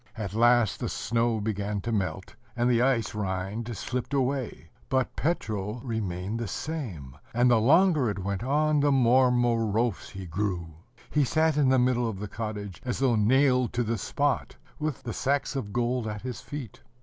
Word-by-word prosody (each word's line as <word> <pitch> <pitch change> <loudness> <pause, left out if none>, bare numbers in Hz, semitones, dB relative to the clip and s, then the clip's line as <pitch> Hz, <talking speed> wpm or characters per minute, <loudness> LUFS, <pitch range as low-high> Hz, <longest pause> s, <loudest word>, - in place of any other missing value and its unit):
At 100 -3 -4
last 120 -2 +4
the - - -2
snow 115 -1 0
began 105 -1 -2
to 115 - -3
melt, 95 -2 -2 0.2
and 120 0 +1
the 120 -1 +3
ice 125 -4 +1
rind 105 +3 -3
slipped 125 +2 -3
away: 130 - -2 0.2
but 130 -1 0
Petro 110 - -2
remained 105 -3 -3
the 115 - -3
same; 95 - -5 0.2
and, 125 +1 +4
the 120 - +5
longer 155 - +4
it 100 - -3
went 100 +1 -3
on, 150 +3 +2
the 145 0 +3
more 130 -1 +5
morose 115 -3 +1
he 95 -1 -8
grew. 90 -2 -3 0.4
He 150 - +3
sat 155 +3 +2
in 145 -3 +3
the 130 - +4
middle 125 -2 +2
of 105 - -5
the 105 +2 -5
cottage 105 -3 -6
as 125 -2 -2
though 130 -3 +2
nailed 125 +3 +3
to 120 - +1
the 115 -1 -2
spot, 145 -2 -1 0.2
with 155 -3 -3
the 120 -2 -4
sacks 140 +3 0
of 115 -7 -3
gold 120 0 0
at 105 0 -5
his 125 -1 -5
feet. 145 -8 -8
120 Hz, 180 wpm, -27 LUFS, 105-130 Hz, 0.4 s, the